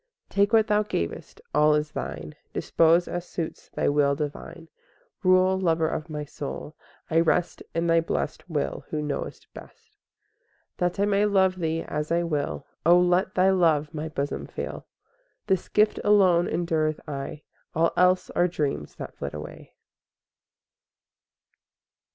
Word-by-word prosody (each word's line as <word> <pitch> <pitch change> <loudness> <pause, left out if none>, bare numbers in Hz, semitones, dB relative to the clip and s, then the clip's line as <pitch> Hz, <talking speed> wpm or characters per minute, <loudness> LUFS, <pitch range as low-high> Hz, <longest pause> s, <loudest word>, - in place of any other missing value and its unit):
IV - - -30
Take 200 +1 +3
what 225 -2 +5
Thou 210 -1 +2
gavest—all 150 - 0
is 150 0 -1
Thine; 75 +4 -5 0.2
Dispose 165 +1 +3
as 175 0 -3
suits 165 -2 -6
Thy - - -1
will 145 -1 +3
divine; 150 +3 -6 0.5
Rule, 185 0 +4
Lover 165 -3 +2
of 155 +1 -4
my 150 -1 -4
soul; 145 +2 -7 0.4
I 165 - +4
rest 170 +1 +1
In 165 0 +1
Thy 165 0 +4
blest 165 +2 -3
will 150 -3 -2
who 155 - -2
knowest 150 -1 -4
best. - - -14
V - - -42 0.8
That 180 +1 -1
I 200 - +3
may 205 0 +2
love 190 -2 +3
Thee 165 -1 -1
as 150 +1 -4
I 170 +1 +2
will, 150 -4 -2 0.2
O 175 +2 +6
let 180 +1 +2
Thy 190 +1 +4
love 160 -5 +2
my 155 +1 -4
bosom 140 -1 -3
fill; - - -6 0.6
This 190 -3 0
gift 210 0 +3
alone 185 -4 +4
endureth 160 -3 0
aye— 145 +1 -6 0.3
All 165 +1 +3
else 180 0 +3
are 175 - +2
dreams 145 - -3
that - - -7
flit 70 +1 -5
away. 75 0 -10
165 Hz, 150 wpm, -26 LUFS, 150-185 Hz, 0.8 s, O